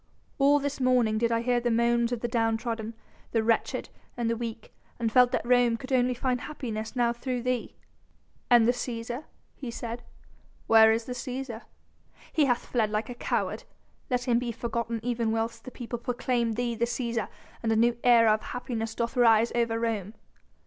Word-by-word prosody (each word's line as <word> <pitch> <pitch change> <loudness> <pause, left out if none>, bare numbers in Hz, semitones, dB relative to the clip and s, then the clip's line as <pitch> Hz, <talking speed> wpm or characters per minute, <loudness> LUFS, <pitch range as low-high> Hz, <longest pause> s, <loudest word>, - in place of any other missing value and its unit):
All 285 +1 +5
this 285 -1 -3
morning 245 -4 +3
did 235 0 +1
I 230 0 +1
hear 245 0 +2
the 240 0 0
moans 235 +1 +2
of 240 -2 -2
the 240 - -1
down 225 -2 +1
trodden, 225 -1 -4 0.4
the 225 -1 +2
wretched 225 0 0 0.3
and 235 -1 0
the - - 0
weak, 225 -1 -6 0.2
and 230 -2 -1
felt 250 +1 +5
that 250 - -1
Rome 245 -1 +3
could 265 +2 -6
only 250 0 +2
find 250 0 -1
happiness 225 -6 -5
now 240 -1 +2
through 245 0 -3
thee." 250 -1 -2 0.7
"And 235 -2 +6
the - - +6
Cæsar?" 240 +2 -5 0.3
he 260 - -7
said. 235 0 -5 0.6
"Where 220 0 +7
is 225 +1 0
the 250 - -4
Cæsar?" 250 -2 -5 0.7
"He 310 -3 +4
hath 245 -3 0
fled 225 -4 0
like 215 +3 -2
a - - -4
coward. 240 - -2 0.5
Let 250 -1 0
him 235 -1 +3
be 245 -1 -3
forgotten 235 0 -3
even 235 -2 0
whilst 225 +1 -2
the - - -6
people 240 -1 -6
proclaim 240 -1 -1
thee 240 +1 -1
the 230 +1 0
Cæsar 235 -1 -2 0.3
and 225 - 0
a - - +3
new 235 +2 +3
era 230 -3 +6
of 215 - -1
happiness 225 -3 -4
doth 235 +2 -2
rise 230 -2 +5
over 235 -1 +1
Rome." 220 -3 -2
235 Hz, 190 wpm, -28 LUFS, 225-245 Hz, 0.7 s, Where